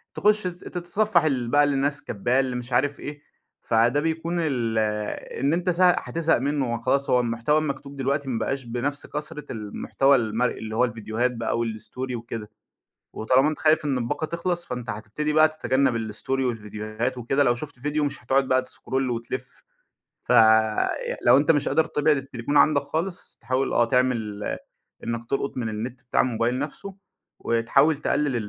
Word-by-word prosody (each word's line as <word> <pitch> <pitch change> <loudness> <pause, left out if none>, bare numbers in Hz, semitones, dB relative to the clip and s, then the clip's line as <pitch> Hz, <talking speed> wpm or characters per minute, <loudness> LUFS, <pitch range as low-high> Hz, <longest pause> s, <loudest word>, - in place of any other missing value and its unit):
تخُش 210 0 +3
ت - - -1
تتصفح 175 +1 0
ال 130 -6 0
بقى 145 +2 +5
اللي 145 -1 +1
الناس 140 +1 0
كاتباه 120 +4 0
اللي 130 -2 0
مش 125 0 -5
عارف 145 +3 +1
إيه 145 0 -7 0.4
فده 120 +5 +2
بيكون 165 +2 -2
ال 125 -8 -1 0.6
إن 140 +3 +2
أنت 180 +2 0
س 180 +1 +1
هتزهق 170 -2 +3
منه 135 -2 -1
وخلاص 130 +4 0
هو 125 - +4
المحتوى 120 +5 +1
المكتوب 140 -2 -4
دلوقتي 140 +1 -1
ما 115 - -1
بقاش 135 -1 -2
بنفس 125 +5 -3
كثرة 150 0 -6
المحتوى 120 +5 +1
المرئي، 115 +2 -1
اللي 110 0 -5
هو 125 +2 +4
الفيديوهات 115 +2 -2
بقى 115 -1 -2
و 115 - 0
الStory 120 +3 -5
وكده، 115 -2 -6 0.6
وطالما 130 +6 +3
أنت 155 - -4
خايف 155 -1 +3
إن 135 -3 +1
الباقة 120 +6 -2
تخلص، 170 +1 -2
فأنت 125 -5 -5
هتبتدي 110 +9 -3
بقى 155 0 +6
تتجنب 130 -7 0
الStory 135 +5 -2
والفيديوهات 110 +1 -3
وكده، 135 +4 +1
لو 120 -2 +3
شُفت 145 -1 -8
فيديو 150 +2 -1
مش 145 0 -5
هتقعد 135 0 +2
بقى 130 0 +4
تسكرول 130 0 -3
وتلف، 115 -1 -5 0.6
فلو 110 +3 +4
أنت 145 +3 +4
مش 145 -2 +1
قادر 160 - +3
تبعد 150 -1 +2
التليفون 135 +1 -2
عندك 150 -2 +5
خالص، 170 +6 -4
تحاول 130 +3 -1
آه 120 - +4
تعمل 115 -5 0 0.6
إنك 115 0 -3
تلقط 140 0 -2
من 115 -3 -2
النت 120 +4 -5
بتاع 125 - +2
الموبايل 120 0 0
نفسه، 180 +7 -6 0.4
وتحاول 135 +6 +2
تقلّل 145 -3 0
130 Hz, 165 wpm, -25 LUFS, 115-150 Hz, 0.6 s, بقى